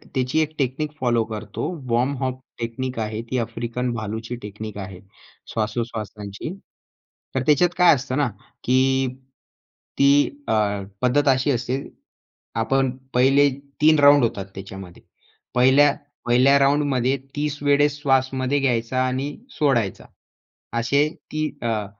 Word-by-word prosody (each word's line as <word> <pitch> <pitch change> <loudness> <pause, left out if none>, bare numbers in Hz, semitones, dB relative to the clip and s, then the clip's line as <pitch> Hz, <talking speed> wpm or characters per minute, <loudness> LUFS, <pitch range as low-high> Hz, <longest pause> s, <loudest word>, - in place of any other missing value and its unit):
त्याची 130 +4 +1
एक 155 0 -2
technique 140 +3 -1
follow 120 -3 +2
करतो. 110 -1 -6 0.3
वॉम 125 +4 +2
हॉफ 130 -1 -2 0.2
टेक्निक 120 +2 -4
आहे 110 0 -3
ती 130 - -1
अफ्रिकन 120 +2 -3
भालूची 110 +2 -4
टेक्निक 105 +1 -7
आहे 95 -2 -7 0.5
श्वासोश्वासाची. 110 - -4 0.8
तर 130 - +1
त्याच्यात 155 +4 +4
काय 180 -2 +7
असतं 130 +1 -3
ना 140 -4 +2 0.3
की 130 +1 +2 0.9
ती 140 0 +6 0.4
अ, - - +1 0.5
पद्धत 145 +4 +2
अशी 130 +2 +3
असते. 125 +2 -1 0.8
आपण 130 +4 +1 0.2
पहिले 135 +3 +5 0.3
3 155 0 +6
राउंड 145 -2 +7
होतात 100 -4 -1
त्याच्यामध्ये. 95 -2 -9 0.5
पहिल्या 135 +3 +5 0.3
पहिल्या 130 +4 +5
राउंडमध्ये 140 -2 +2 0.2
30 145 0 -2
वेळेस 145 0 +3
श्वास 135 -2 +3
मध्ये 130 +2 0
घ्यायचा 130 -1 0
आणि 135 +3 -3 0.2
सोडायचा. 120 -9 +1 0.7
असे 140 +6 +2 0.2
ती 155 0 -1
अ, 110 -3 -1
130 Hz, 125 wpm, -23 LUFS, 115-140 Hz, 0.9 s, काय